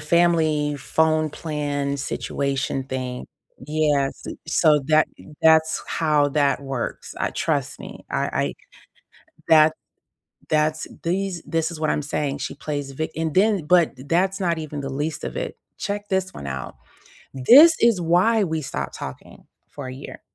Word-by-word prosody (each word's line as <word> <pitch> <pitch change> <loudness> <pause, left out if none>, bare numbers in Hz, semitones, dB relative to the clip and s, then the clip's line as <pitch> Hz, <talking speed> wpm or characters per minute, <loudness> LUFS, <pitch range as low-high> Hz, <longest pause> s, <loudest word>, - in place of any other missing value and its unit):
family 155 -2 +2
phone 155 +3 +1
plan 145 -2 -3
situation 140 -1 -2
thing. 130 -1 -5 0.4
Yes, 150 -3 0 0.2
so, 160 -1 +4
eh, - - +3
that 155 0 +4
m 155 - -14
that's 160 0 +4
how 150 -3 +2
that 140 -1 +1
works. 135 -3 -5
I - - -1
trust - - -2
me. - - -10
I - - 0
I - - -1 0.9
that 155 0 +6 0.7
that's 155 0 +1 0.2
these 180 0 -2
this 165 0 -1
is 170 - -7
what 155 -1 0
I'm - - 0
saying. 145 -1 -2
She 135 - -4
plays 145 -2 -4
vi 155 +4 -3
and 160 -1 -2
then 195 -4 +3
but 175 -2 +4 0.2
that's 190 +4 +1
not 170 -3 0
even 150 -2 -5
the 135 - -4
least 145 +4 -3
of - - -5
it. - - -4 0.2
Check 205 0 -4
this 190 -1 -1
one 70 - -8
out. 65 -1 -5 0.6
This 280 - +8
is 230 -5 +3
why 180 +7 +3
we 160 -3 -2
stopped 70 - -4
talking 70 - -9 0.2
for 145 -3 -8
a 130 - -6
year. 135 - -9
155 Hz, 155 wpm, -23 LUFS, 140-170 Hz, 0.9 s, This